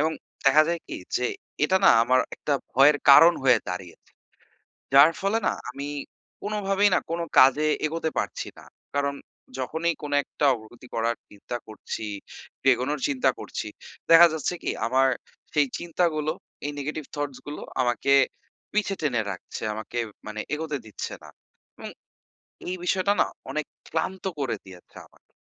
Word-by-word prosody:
এবং 160 +2 +2 0.3
দেখা 150 +3 +7
যায় 170 -1 -1
কি, - - -6 0.2
যে 125 - -1 0.4
এটা 190 +5 +3
না - - +9
আমার 130 +2 +4 0.2
একটা 145 - -2 0.2
ভয়ের 145 +3 +6
কারণ 165 +5 +9
হয়ে 125 -4 +5
দাঁড়িয়েছে। 90 -1 -7 0.8
যার 145 +4 +8
ফলে 200 +3 +1
না, - - +2 0.2
আমি 140 +3 -6 0.6
কোনোভাবেই 205 -1 +2
না - - +4
কোনো 170 0 -1 0.2
কাজে 145 +4 +6 0.2
এগোতে 160 +1 -1
পারছি - - -2
না, - - -13 0.3
কারণ 140 0 +1 0.4
যখনই 160 +6 -1
কোনো 145 -1 -1
একটা 145 - -2
অগ্রগতি 120 +2 -11
করার 115 +1 +1
চিন্তা 105 +4 -6
করছি, 110 0 -6 0.5
একটু - - -5
এগোনোর 135 +4 -2
চিন্তা 135 -1 +2
করছি, - - -5 0.4
দেখা 170 +1 +10
যাচ্ছে 160 +3 -2
কি - - -1 0.2
আমার 130 +2 +3 0.5
সেই 145 -2 +3
চিন্তাগুলো, 165 -3 0 0.3
এই 145 - -1
negative 150 +1 -4
thoughts 145 -2 -3
গুলো 145 - -6 0.2
আমাকে 125 +2 +1 0.6
পিছে 210 -2 +1
টেনে 125 -7 +1
রাখছে, 90 - -8
আমাকে 110 +2 -6 0.3
মানে 110 0 -5
এগোতে 150 -1 -2
দিচ্ছে 110 - -6
না - - -11 0.5
এবং - - -7 0.8
এই 185 - -2
বিষয়টা 190 +2 +2
না - - +4 0.3
অনেক 155 -1 -2 0.2
ক্লান্ত 190 0 -2 0.2
করে 130 -5 -1
দিয়েছে 90 -2 -15
আমাকে। - - -29
145 Hz, 150 wpm, -26 LUFS, 125-165 Hz, 0.8 s, দেখা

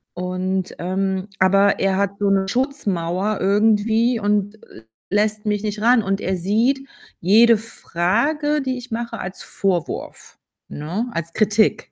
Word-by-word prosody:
und, 185 +1 -2
ähm 190 +2 -2
aber 195 +2 +4
er 195 -1 +1
hat 200 -1 +1
so 200 -1 +1
'ne 195 -1 +2
Schutzmauer 205 - -1
irgendwie 220 +4 +2
und 205 0 0 0.2
l 110 - -14 0.3
lässt 210 +1 0
mich 210 0 -1
nicht 210 0 -3
ran 235 -1 +4
und 195 0 -1
er 190 0 -1
sieht 225 +9 +1 0.4
jede 225 +6 +6
Frage, 235 - -1
die 260 -1 -2
ich 250 0 -10
mache, 235 0 -4
als 185 +1 -6
Vorwurf, 185 -4 -3 0.3
ne, 175 +11 -4
als 165 0 -4
Kritik. 215 0 +1
205 Hz, 140 wpm, -21 LUFS, 190-225 Hz, 0.4 s, jede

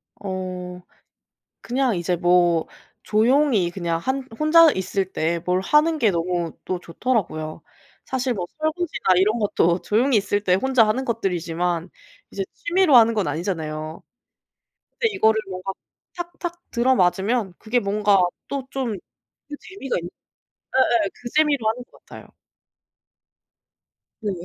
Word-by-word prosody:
어. 185 -2 -6 0.8
그냥 255 -1 0
이제 175 +1 -1
뭐 175 -1 +3 0.4
조용히 225 -3 +2
그냥 170 -2 -2
한 260 +8 -2
혼자 320 +1 +6
있을 190 0 -2
때 165 +2 0
뭘 180 +2 0
하는 305 +9 +3
게 225 -7 +3
너무 170 -1 -2
또 185 -1 -3
좋더라고요. 170 -5 -2 0.4
사실 260 -1 -1
뭐 185 -6 -4
설거지나 315 - -2
이런 210 +5 +3
것도 180 -4 +1
조용히 240 +4 +2
있을 205 0 0
때 185 -3 +3
혼자 250 +2 +3
하는 255 +5 0
것들이지만 175 -6 -2 0.4
이제 195 - -3
취미로 350 -5 +3
하는 230 -1 +7
건 210 -7 0
아니잖아요. 155 -1 -4 0.9
근데 465 - 0
이거를 220 - +3
뭔가 185 +1 -4 0.4
탁탁 345 0 -6
들어맞으면 225 -3 +1
그게 235 +3 0
뭔가 205 -1 +2 0.3
또 280 -1 -3
좀 255 -5 -2 0.5
그 295 - -5
재미가 370 -9 -5
있는 175 0 -5 0.7
예예 235 -5 +3
그 245 - -8
재미로 290 -7 +3
하는 245 +3 -2
것 - - -21
같아요. - - -12 2.0
네. 205 - -1
210 Hz, 265 characters per minute, -22 LUFS, 180-260 Hz, 2.0 s, 하는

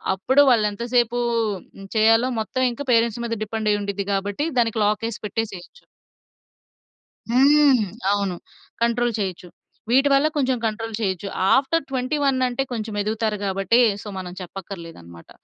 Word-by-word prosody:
అప్పుడు 265 +9 +4
వాళ్ళెంత 210 -2 +1
సేపూ 240 0 +2 0.8
చేయాలో 225 +3 +4
హ్మ్, 225 - -2
మొత్తం 255 +4 -2
ఇంకా 285 +4 -7
పేరెంట్స్ 230 0 +2
మీద 230 - -3
డిపెండ్ 220 0 -2
అయ్యి 205 0 0
ఉండిద్ది 200 0 -3
గాబట్టి, 200 +9 -2
దానికి 225 -1 +1
లాక్ 210 +2 0
యేసి 230 - -8
పెట్టేసేయొచ్చు. 210 - -6 1.4
హ్మ్. 270 -2 +4 0.3
అవును. 200 -3 0 0.5
కంట్రోల్ 235 0 +1
చేయొచ్చు. 185 -3 -4 0.4
వీటి 270 +3 +4
వల్ల 275 +2 +4
కొంచెం 260 -3 +1
కంట్రోల్ 225 +1 -3
చేయొచ్చు. 195 -2 -2 0.3
ఆఫ్టర్ 280 +4 +2
21 270 +1 0
అంటే 250 +2 -2
కొంచెం 220 -2 -4
ఎదుగుతారు 215 0 -1
గాబట్టి 195 +3 +1 0.2
సో, - - -8
మనం 180 -1 -6
చెప్పక్కర్లేదు 180 - -8
అన్నమాట. 85 0 -14
225 Hz, 140 wpm, -22 LUFS, 200-250 Hz, 1.4 s, అప్పుడు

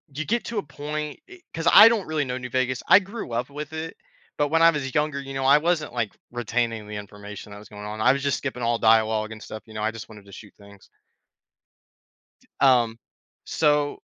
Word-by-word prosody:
You 155 - -2
get 235 +6 -1
to 230 - -5
a 205 - 0
point 150 +1 -6
e 365 -1 -14
'cause 165 0 -3
I 210 +2 +10
don't 225 -4 -1
really 155 -1 0
know 125 0 -3
New 125 -1 -7
Vegas, 130 0 -1
I - - +8
grew 200 - -7
up 125 +3 -2
with 150 +2 -7
it, 160 +1 -6 0.4
but 145 - +2
when 165 +2 +2
I 165 - +8
was 140 -5 -3
younger, 150 -1 0
you 135 0 -8
know, 135 0 -3
I 140 +2 +7
wasn't, 155 -3 -1
like, 115 -4 -2 0.2
retaining 115 -2 -2
the 105 - -7
information 105 0 -9
that 100 - -9
was 105 - -15
going 105 -1 -9
on, 105 +1 -6
I 125 +3 +5
was 140 0 -4
just 140 -1 +1
skipping 130 -3 -5
all 115 0 +1
dialogue 110 -1 +3
and 110 0 -9
stuff, 110 -2 -9
you 110 - -13
know, 105 0 -4
I 110 - +1
just 115 -1 -9
wanted 105 -2 -13
to 100 - -16
shoot 105 +2 -12
things. 100 -1 -17 1.5
D - - -28
um, 120 -4 +4 0.5
so 150 -2 +1
130 Hz, 230 wpm, -24 LUFS, 110-150 Hz, 1.5 s, I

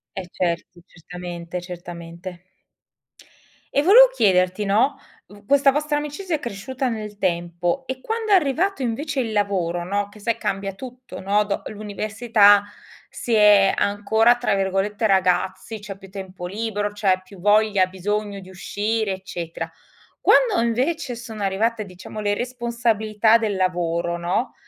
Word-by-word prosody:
Eh, 185 -2 -5
certo, 175 0 -3
certamente, 175 0 -7
certamente. 175 0 -9 1.3
E 285 - +3
volevo 465 +9 +9
chiederti, 185 - +2
no, 230 +8 +2 0.3
v 205 0 -16
questa 280 +1 +4
vostra 295 +1 0
amicizia 300 +4 -3
è - - -4
cresciuta 255 +2 -4
nel 215 -3 -5
tempo, 175 +5 -1
e 260 0 -5
quando 445 - -3
è - - +8
arrivato 335 +2 +1
invece 275 +4 -2
il 225 -4 -2
lavoro, 185 -4 0
no, 200 +3 -1
che 210 - -16
sai 230 +2 -1
cambia 195 0 -3
tutto, 250 +3 -10
no, 200 +2 +2
do 205 -1 -3
l'università 210 0 +3 0.5
si 240 - -4
è 210 -2 +6
ancora 220 +4 +3
tra 245 - 0
virgolette 195 +3 -1
"ragazzi", 190 +2 +1
c'è 200 -1 -8
più 195 -1 -14
tempo 190 -2 -8
libero, 205 +1 -2
c'è 195 -3 +1
più 190 0 -15
voglia, 205 -1 +3
bisogno 200 +2 -3
di 185 -1 -13
uscire, 205 +3 -2
eccetera. 175 -3 -6 0.5
Quando 460 - +4
invece 255 +3 -1
sono 225 -3 -7
arrivate 215 +3 0
diciamo 185 +3 -10
le 205 -1 +1
responsabilità 230 -2 +1
del 220 -3 -1
lavoro, 175 -2 0
no, 175 +8 -1
205 Hz, 140 wpm, -22 LUFS, 185-235 Hz, 1.3 s, volevo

